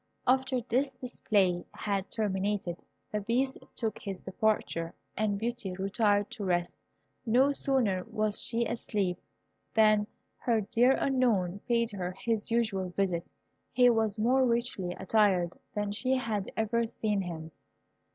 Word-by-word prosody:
After 260 0 +2
this 260 +3 0
display 205 -8 +1
had 200 -2 -2
terminated, 200 -4 -1 0.3
the 210 - -1
Beast 255 +6 0 0.2
took 225 -3 -2
his 195 -3 -5
departure, 190 -4 -1 0.2
and 210 -2 0
Beauty 230 -3 -3
retired 205 +1 +1
to 205 - -5
rest. 175 -2 0 0.5
No 255 +4 +4
sooner 245 -10 +1
was 215 -2 -1
she 235 0 0
asleep 200 -6 -1 0.6
than 215 -1 +5 0.3
her 230 -3 +1
dear 240 +6 +4
Unknown 225 -10 +1
paid 235 -1 +2
her 185 -3 -4
his 220 +3 -2
usual 215 -5 0
visit. 180 -2 -1 0.4
He 245 -1 +6
was 220 -2 +1
more 250 +5 +3
richly 235 -7 0
attired 190 -3 +2 0.2
than 205 -1 -1
she 255 +6 0
had 220 -6 -2
ever 230 +1 +1
seen 210 -3 -1
him. 165 -3 -6
215 Hz, 130 wpm, -30 LUFS, 195-235 Hz, 0.6 s, He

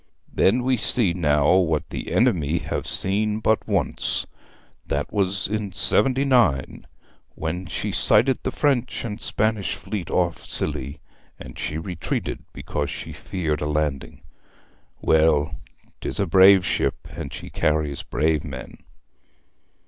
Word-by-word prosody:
'Then 120 +6 +3
we 130 0 +2
see 110 -4 +1
now 75 -3 +3
what 80 -5 +1
the - - -5
enemy 80 -1 +2
have - - -4
seen 105 +2 0
but 110 0 +1
once. 100 -8 0 0.6
That - - -2
was 95 -2 +1
in 105 -2 -3
seventy 130 +7 +2
nine, 115 - +2 0.5
when 85 +3 -4
she 105 +4 -3
sighted 115 +6 +4
the - - -2
French 130 -5 0
and 105 -1 -5
Spanish 110 -2 0
fleet 100 -6 -5
off - - 0
Scilly, 70 +3 -2 0.4
and - - -10
she 75 - -3
retreated 85 +1 -4
because - - -4
she - - -6
feared 80 -6 -3
a 75 - -1
landing. 75 -3 -2 0.8
Well, 80 -1 +3 0.5
'tis - - -4
a 100 - +2
brave 95 +1 +6
ship - - -1
and 75 -2 -6
she - - -8
carries 75 -2 0
brave 75 0 0
men!' 65 -4 -8
90 Hz, 135 wpm, -23 LUFS, 75-105 Hz, 0.8 s, brave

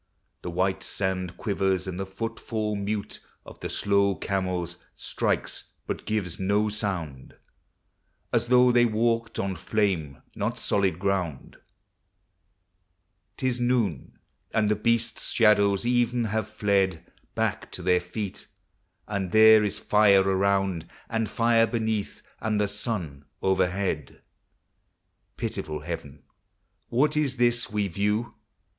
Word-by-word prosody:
The - - -5
white 95 +2 0
sand 95 -2 -2
quivers, 95 -3 0
and 95 -1 -5
the 95 - -3
footfall 110 +1 -3
mute 100 0 -3 0.3
Of - - -12
the - - -5
slow 100 -1 +2
camels 90 -3 -2 0.2
strikes - - -2 0.2
but - - -5
gives 100 -5 -2
no 100 +3 +2
sound, 85 -11 -4 1.0
As - - +2
though 125 0 +6
they 120 0 +5
walked 115 +1 0
on 95 -1 -1
flame, 90 - -1
not - - -2
solid 95 -5 +1
ground! 90 -6 -2 1.8
'T - - -4
is 125 -1 +1
noon, 120 - 0 0.4
and 110 -2 +3
the 105 - +3
beasts' 115 +2 0
shadows 100 -2 +4
even 120 0 +2
have 110 -1 -1
fled 100 -5 0 0.3
Back - - -1
to - - -5
their 90 -1 +3
feet, 95 +2 -6 0.6
and 100 -3 -2
there 110 0 +7
is 105 - -1
fire 100 -2 +4
around 95 -2 +1 0.2
And 115 -2 0
fire 115 0 +3
beneath, 110 -3 -2 0.2
and 110 -1 0
the 105 - +2
sun 95 - -4 0.2
overhead 95 -5 0 1.1
Pitiful 75 -1 -3
Heaven! 75 -4 -7 0.7
what 145 +5 +2
is 145 -4 +1
this 120 -1 +2
we 105 -1 0
view? 105 +5 -1
100 Hz, 125 wpm, -26 LUFS, 95-110 Hz, 1.8 s, there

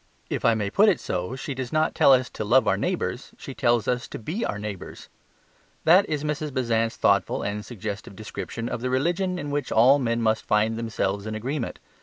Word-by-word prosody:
If - - -2
I 115 - +5
may 105 -2 -2
put 210 +2 +5
it 185 - +1
so, 90 +7 -3
she 135 +1 -5
does 130 -1 -5
not 155 0 +1
tell - - +5
us 130 -1 +4
to - - -4
love 125 +5 +4
our - - +4
neighbours; - - -3
she - - -8
tells 120 -2 +1
us 125 0 -1
to - - -7
be 165 - -4
our 105 - -2
neighbours. 105 -3 -7 0.7
That 180 +5 +5
is 150 -2 -1
Mrs. 150 0 -2
Besant's 115 -3 0
thoughtful - - +2
and 105 +1 -3
suggestive 105 -3 -6
description 110 +2 -6
of 120 - -4
the 130 - -1
religion 175 +8 0
in 145 -4 -4
which 145 -2 -2
all 130 +6 +6
men 115 -3 0
must 110 -1 +1
find 110 +1 +2
themselves 110 -3 -2
in 110 - -4
agreement. 125 +4 -3
120 Hz, 210 wpm, -25 LUFS, 110-145 Hz, 0.7 s, all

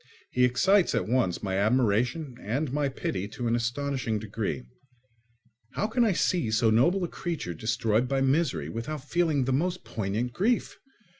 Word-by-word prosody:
He 125 - +2
excites 180 +8 +3
at 115 - 0
once 115 -7 0
my 95 -1 -1
admiration 125 +6 +1
and 130 +6 -2
my 145 -1 +1
pity 100 -7 -3
to 115 +4 -6
an 115 - +2
astonishing 120 -1 -1
degree. 100 - -3 1.1
How - - -1
can 235 +3 +1
I 220 - +3
see 170 -7 +1
so 110 +1 +3
noble 170 - +3
a - - 0
creature 165 - -4
destroyed 110 +5 0
by 135 +1 0
misery 135 - +1
without 130 - -5
feeling 160 -5 +1
the 130 - 0
most 180 +6 -1
poignant 110 +4 -3
grief? 225 - 0
125 Hz, 160 wpm, -27 LUFS, 110-155 Hz, 1.1 s, excites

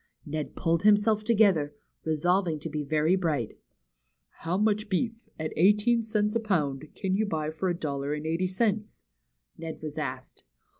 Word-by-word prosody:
Ned 155 0 -4
pulled 165 -1 +1
himself 210 +1 +4
together, 200 -10 +3 0.3
resolving 165 +2 +1
to 165 - -4
be 150 0 -2
very 155 +4 +2
bright. 155 - -1 0.8
How 170 +3 -1
much 210 0 +1
beef, 225 +3 -2
at 155 0 -3
eighteen 210 +7 +4
cents 215 -1 0
a - - +3
pound, 155 -10 -1
can 190 -1 -1
you 210 +2 +1
buy 155 -4 -2
for 170 +4 -2
a 175 - 0
dollar 140 -3 -3
and 150 +1 -6
eighty 165 +3 0
cents? 210 +2 -1 0.3
'' - - -47
Ned 160 -1 -6
was 150 -2 -4
asked. - - -5
180 Hz, 165 wpm, -28 LUFS, 155-210 Hz, 0.8 s, himself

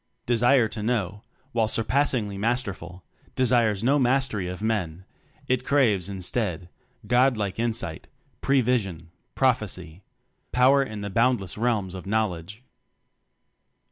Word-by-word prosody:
Desire 120 +1 +4
to 110 0 -6
Know, 105 -3 -1 0.3
while 115 -3 +1
surpass 130 +6 +1
ingly 105 -6 -2
Masterful, 100 -5 -3 0.3
desires 115 -5 +2
no 140 +4 +3
mastery 125 -7 +1
of 90 +3 -6
Men; 95 -6 -2 0.4
it 130 -1 +1
craves 110 -10 +2
instead, 90 -2 -3 0.4
God 125 +2 +3
like 100 -1 -3
insight, 110 -8 -2 0.3
pre 135 -1 +3
vision, 100 -10 -1 0.2
prophecy 100 -9 -1 0.5
power 130 +3 +5
in 110 -6 -4
the 100 -1 -5
boundless 115 -3 +1
realms 105 -5 -1
of 95 +1 -8
Knowl 110 -2 +1
edge. 100 +9 -12
110 Hz, 125 wpm, -25 LUFS, 95-125 Hz, 0.5 s, power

